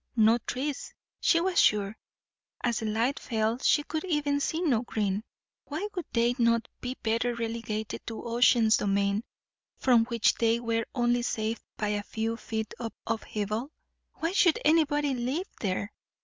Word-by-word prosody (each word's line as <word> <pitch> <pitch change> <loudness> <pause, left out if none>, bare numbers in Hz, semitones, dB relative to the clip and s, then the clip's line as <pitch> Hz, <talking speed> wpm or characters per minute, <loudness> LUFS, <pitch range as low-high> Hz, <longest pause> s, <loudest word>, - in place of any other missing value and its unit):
No 225 +1 +5
trees, 265 +4 -4 0.2
she 335 - +4
was 360 +1 +1
sure; 205 0 +2 0.7
as 240 -3 +1
the 220 - -3
light 230 +6 0
fell 225 0 -1
she 295 - +3
could 315 +1 -3
even 295 -4 +1
see 315 +3 -1
no 280 -11 +2
green. 210 -4 -1 0.4
Why 325 +8 -4
would 360 -4 -4
they 235 +1 +2
not 230 -1 +3
be 255 +1 -5
better 230 +2 +1
relegated 225 -2 -4
to 225 - -5
Ocean's 235 -2 +4
domain, 200 +1 +1 0.5
from 240 -3 +4
which 235 -2 +2
they 230 0 +2
were 230 -1 -1
only 240 -1 +2
saved 225 -1 -2 0.2
by 210 - -1
a 210 0 0
few 225 +2 -3
feet 220 -1 -4
of 230 -2 -4
upheaval? 220 +2 -2 0.5
why 330 +2 -1
should 360 -4 +4
anybody 295 -2 +3
live 260 +9 -2
there? 200 +1 -2
235 Hz, 155 wpm, -28 LUFS, 220-275 Hz, 0.7 s, No